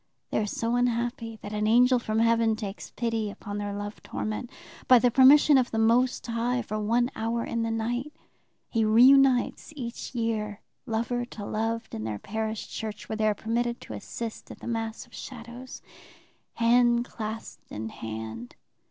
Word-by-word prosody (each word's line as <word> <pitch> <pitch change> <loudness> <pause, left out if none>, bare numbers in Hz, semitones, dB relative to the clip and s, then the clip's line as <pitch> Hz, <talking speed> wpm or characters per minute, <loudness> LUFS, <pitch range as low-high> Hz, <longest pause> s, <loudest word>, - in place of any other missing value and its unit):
They - - +1
are 210 - 0
so 230 +3 -1
unhappy 235 -2 -1
that 205 - -6
an 210 0 0
angel 250 +3 +5
from 215 -2 -2
heaven 230 -1 +3
takes 210 -2 -6
pity 225 -3 -2
upon 205 0 -6
their 205 0 -3
love 205 +1 -6
torment. 215 +3 -4 0.4
By 255 - +8
the 245 +1 +3
permission 275 +3 +7
of 245 - 0
the 225 - -3
Most 235 +3 +3
High, 240 +1 -1
for 215 - -3
one 235 +4 +1
hour 230 +1 -1
in 230 - -2
the 230 - 0
night, 240 +5 -2 0.6
he 225 -2 +1
reunites 255 +5 +5
each 250 -1 -6
year 215 -3 -1 0.3
lover 235 +2 -1
to 215 -4 -8
loved 225 +2 -2
in 110 - -4
their 110 -1 -3
parish 220 - -4
church, 215 -2 -6
where 220 - -2
they 215 0 +1
are 210 - +2
permitted 235 +3 -1
to - - -8
assist 230 -2 -6
at - - -9
the - - -11
Mass 225 -1 -3
of 240 - -25
Shadows, 245 +1 -9 0.7
hand 240 0 +4
clasped 220 -1 -7
in 110 +1 -4
hand. 110 +1 -7
230 Hz, 170 wpm, -27 LUFS, 215-240 Hz, 0.7 s, By